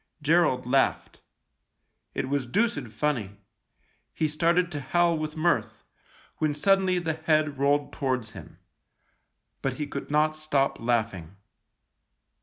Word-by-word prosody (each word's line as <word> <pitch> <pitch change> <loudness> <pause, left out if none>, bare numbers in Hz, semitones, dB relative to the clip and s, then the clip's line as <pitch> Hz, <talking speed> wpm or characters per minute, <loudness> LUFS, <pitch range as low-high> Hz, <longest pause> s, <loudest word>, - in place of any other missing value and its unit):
Gerald 150 -5 +3
laughed. 135 +2 0 0.9
It 130 - -2
was 140 -2 -1
deuced 145 - 0
funny; 110 -3 -2 0.8
he 155 - +1
started 170 +3 +1
to 145 -3 -4
howl 170 +5 +2
with 155 0 -4
mirth, 120 -10 0 0.5
when 150 -2 0
suddenly 190 +3 +3
the 165 -2 -1
head 155 -2 0
rolled 145 +1 +1
towards 125 -5 -2
him. 100 - -12 1.0
But 135 - -1
he 150 +3 -4
could 140 -1 -6
not 155 +1 +2
stop 150 -3 0
laughing. 110 -7 -1
145 Hz, 120 wpm, -27 LUFS, 125-160 Hz, 1.0 s, Gerald